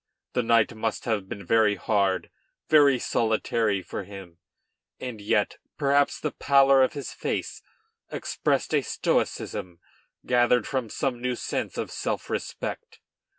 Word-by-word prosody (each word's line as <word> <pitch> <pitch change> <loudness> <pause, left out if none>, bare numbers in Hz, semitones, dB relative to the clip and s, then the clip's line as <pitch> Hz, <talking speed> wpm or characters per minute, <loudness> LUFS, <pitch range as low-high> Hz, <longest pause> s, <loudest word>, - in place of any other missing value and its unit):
The 125 - +2
night 115 -1 +3
must 110 0 -3
have 105 -5 -1
been 100 -2 -7
very 110 0 +4
hard, 100 -4 0 0.4
very 145 -4 +6
solitary 110 -3 0
for 100 - -5
him; 95 -3 -11 0.6
and 120 -5 -6
yet, 105 0 0 0.2
perhaps, 140 -1 +2
the 150 - -2
pallor 135 -1 +5
of 130 - +3
his 140 -3 -6
face - - -3 0.5
expressed - - -1
a - - +4
stoicism 90 -2 -2 0.5
gathered 125 0 +3
from 130 -5 -2
some 125 +2 -2
new 125 0 -1
sense - - -3
of - - -3
self - - -3
respect. - - -5
115 Hz, 135 wpm, -26 LUFS, 105-130 Hz, 0.6 s, very